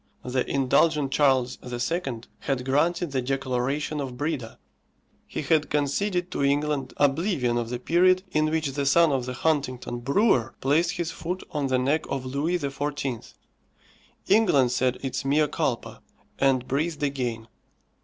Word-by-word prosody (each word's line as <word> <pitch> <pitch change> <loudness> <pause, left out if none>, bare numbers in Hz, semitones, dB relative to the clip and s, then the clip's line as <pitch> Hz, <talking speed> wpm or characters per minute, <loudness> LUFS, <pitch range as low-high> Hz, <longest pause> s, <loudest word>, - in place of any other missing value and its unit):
The 125 0 -1
indulgent 140 +1 +2
Charles 130 -4 +2
II. 125 +1 -3 0.2
had 130 -2 -2
granted 165 +5 +1
the 130 -1 0
declaration 135 +3 -1
of 130 -3 -5
Breda. 145 -6 -3 0.7
He - - -4
had 155 0 +2
conceded 175 +6 0
to - - -1
England 145 -1 0
oblivion 145 - +1
of 115 -1 -3
the 125 - -2
period 185 +7 +3
in 155 -1 +2
which 155 -3 -1
the 140 0 -2
son 165 +2 +5
of 130 -2 -1
the 125 - -3
Huntingdon 130 -4 -1
brewer 135 - +2
placed 160 +6 +2
his 170 -3 -3
foot 180 +3 -5
on 145 -2 -1
the 130 -1 +2
neck 140 +5 +1
of 135 -1 -3
Louis 145 +7 0
XIV. 140 -4 -4 0.9
England 180 - +4
said 125 0 +1
its 135 +1 -2
mea 150 +2 +2
culpa, 140 -5 -3 0.4
and 130 -2 +2
breathed 150 +2 -1
again. 125 -5 -2
140 Hz, 145 wpm, -26 LUFS, 130-155 Hz, 0.9 s, son